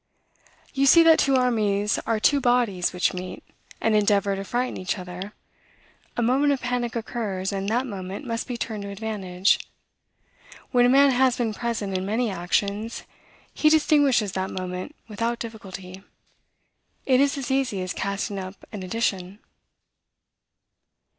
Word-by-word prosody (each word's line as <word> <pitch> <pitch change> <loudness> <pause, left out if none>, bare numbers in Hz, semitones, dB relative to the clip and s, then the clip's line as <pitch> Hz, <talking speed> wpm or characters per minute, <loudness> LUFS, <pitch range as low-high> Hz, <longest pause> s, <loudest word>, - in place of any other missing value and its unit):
You 275 0 +2
see 335 +5 +8
that 325 -1 +6
two 275 -1 +3
armies 210 -5 +1
are 225 -1 +1
two 280 +5 +3
bodies 240 -8 +2
which 180 -1 0
meet, 185 0 -7 0.4
and 225 -1 +2
endeavor 200 -1 +2
to 195 - -4
frighten 245 +5 -2
each 185 +2 -2
other: 180 +2 -7 0.8
a 240 - +1
moment 270 +5 +3
of 275 - -2
panic 245 -1 -2
occurs, 210 -5 -3
and 195 0 -2
that 245 +4 +1
moment 195 +1 -6
must 230 -1 -3
be 245 -2 -4
turned 220 -2 -4
to 200 - -6
advantage. 200 -3 0 1.1
When 245 -1 +5
a - - +3
man 275 +2 +6
has 255 0 +3
been 230 -3 -1
present 220 -4 -3
in 185 - -1
many 220 +3 0
actions, 200 +5 -2 0.5
he 305 - +3
distinguishes 290 -8 +3
that 190 0 -2
moment 185 +9 -5
without 230 +2 -2
difficulty; 195 -5 -8 1.0
it 260 -1 +4
is 280 +1 +2
as 270 -1 -4
easy 260 -8 0
as 185 - -3
casting 200 0 -3
up 185 +1 -7 0.2
an 210 -3 -6
addition." 190 -1 -2
215 Hz, 150 wpm, -24 LUFS, 195-245 Hz, 1.1 s, see